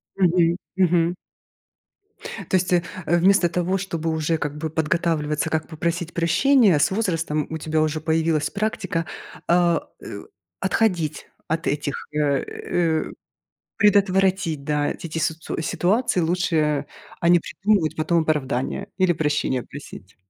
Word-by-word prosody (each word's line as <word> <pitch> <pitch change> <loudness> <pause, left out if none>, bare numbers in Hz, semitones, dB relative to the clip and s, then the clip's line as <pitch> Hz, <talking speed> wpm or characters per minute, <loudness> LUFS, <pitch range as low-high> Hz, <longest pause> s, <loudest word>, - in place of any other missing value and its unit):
Мгм 175 -2 +3 0.2
мгм. 175 -1 +2 1.3
То - - +2
есть, 185 0 +1
э 175 -1 +3 0.2
э, 175 - +3
вместо 180 -1 +4
того, 180 +3 0
чтобы 165 -4 -3
уже, 160 +1 0
как 150 -1 -4
бы, 160 +1 -3
подготавливаться, 160 -1 0
как 155 -1 -1
попросить 170 +1 -3
прощения, 185 - +4
с 145 - +3
возрастом 165 -7 -1
у 160 - -3
тебя 155 0 0
уже 155 0 0
появилась 160 -1 +1
практика, 200 -5 -2 0.4
а, 170 -1 +2
э, - - -8 0.4
отходить 175 -9 0 0.2
от 165 +1 -2
этих, 145 0 -1 0.2
э - - -3
э 155 +3 0 0.7
предотвратить, 190 -6 +2
да, 145 0 0
эти 170 - -6
ти 160 - -6
сицу 160 0 -2
ситуации. 190 +3 +1
Лучше, 175 +1 0
а 150 -2 +1 0.4
а, - - +5
не 175 -1 +6
придумывать 195 -3 0
потом 165 +1 +2
оправдания 150 +4 -1
или 185 -2 +3
прощение 145 -5 0
просить. 115 -9 -11
165 Hz, 135 wpm, -23 LUFS, 155-180 Hz, 1.3 s, не